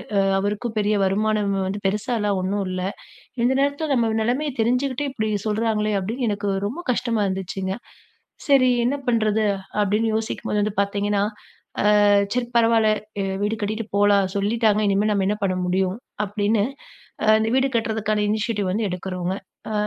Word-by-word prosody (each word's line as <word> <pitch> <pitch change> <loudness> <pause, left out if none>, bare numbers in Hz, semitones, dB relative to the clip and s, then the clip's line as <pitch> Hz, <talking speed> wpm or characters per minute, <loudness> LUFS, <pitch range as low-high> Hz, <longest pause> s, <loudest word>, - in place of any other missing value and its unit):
அ - - +4 0.2
அவருக்கும் 210 +3 -2
பெரிய 210 +1 +1
வருமானம் 205 +1 +1
வந்து 200 +2 -3
பெருசாலாம் 210 0 0
ஒண்ணும் 195 +2 -1
இல்ல, 185 0 -3 0.6
"இந்த 255 +2 +3
நேரத்துல 285 +2 0
நம்ம 230 -3 +2
நிலைமைய 265 +6 0
தெரிஞ்சுக்கிட்டே, 255 +4 0
இப்டி 220 -4 -2 0.2
சொல்றாங்களே!" 215 0 0
அப்டின்னு 230 +6 -2
எனக்கு 205 0 -2 0.2
ரொம்ப 275 +11 -6
கஷ்டமா 235 -2 0
இருந்துச்சுங்க. 190 0 -3 0.7
சரி 270 -3 +5
என்ன 255 +4 +1
பண்றது? 220 -2 +2 0.4
அப்படின்னு 210 +3 +1
யோசிக்கும்போது 220 -1 -2
வந்து 205 0 -1
பாத்தீங்கன்னா, 200 0 0 0.8
அ - - +5 0.3
"சரி 245 -1 -1
பரவால்ல! 225 -1 +4 0.3
எ - - -1 0.2
வீடு 210 +2 0
கட்டிட்டு 215 +2 -2
போலாம், 205 -1 +4
சொல்லிட்டாங்க 215 +1 +2
இனிமேல் 200 +2 +2
நம்ம 195 -2 +1
என்ன 210 +1 0
பண்ண 185 -1 +1
முடியும்?" 185 +2 0 0.3
அப்டின்னு 205 +1 +1 0.7
அந்த 220 0 +1
வீடு 265 +1 +3
கட்றதுக்கான 215 -2 0
இனிஷியேட்டிவ் 210 -2 -1
வந்து 215 +3 0
எடுக்குறோங்க. 180 0 -3 0.4
அ - - -2
215 Hz, 145 wpm, -23 LUFS, 200-230 Hz, 0.8 s, சரி